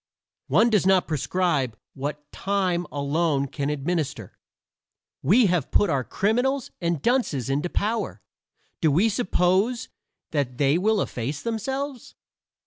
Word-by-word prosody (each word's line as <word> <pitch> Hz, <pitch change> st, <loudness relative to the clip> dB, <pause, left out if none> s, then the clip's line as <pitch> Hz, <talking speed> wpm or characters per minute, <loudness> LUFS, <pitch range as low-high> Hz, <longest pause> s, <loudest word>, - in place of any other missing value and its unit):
One 220 Hz, -, +4 dB
does 200 Hz, -4 st, +3 dB
not 190 Hz, -1 st, +4 dB
prescribe 150 Hz, -6 st, 0 dB, 0.2 s
what 145 Hz, +2 st, -6 dB
time 185 Hz, -3 st, -1 dB
alone 145 Hz, 0 st, 0 dB
can 140 Hz, +1 st, -3 dB
administer. 150 Hz, +1 st, -2 dB, 0.9 s
We 230 Hz, +5 st, +5 dB
have 175 Hz, -7 st, +1 dB
put 205 Hz, -5 st, +3 dB
our 135 Hz, -3 st, +1 dB
criminals 245 Hz, -, 0 dB
and 170 Hz, -4 st, -1 dB
dunces 165 Hz, -, +1 dB
into 145 Hz, +6 st, 0 dB
power; 220 Hz, +5 st, -2 dB, 0.6 s
do 160 Hz, -, +4 dB
we 185 Hz, +10 st, +3 dB
suppose 200 Hz, +2 st, +1 dB, 0.4 s
they 140 Hz, +1 st, +1 dB
will 215 Hz, +1 st, +2 dB
efface 135 Hz, +5 st, -4 dB
themselves? 265 Hz, +4 st, -4 dB
175 Hz, 120 wpm, -25 LUFS, 145-215 Hz, 0.9 s, We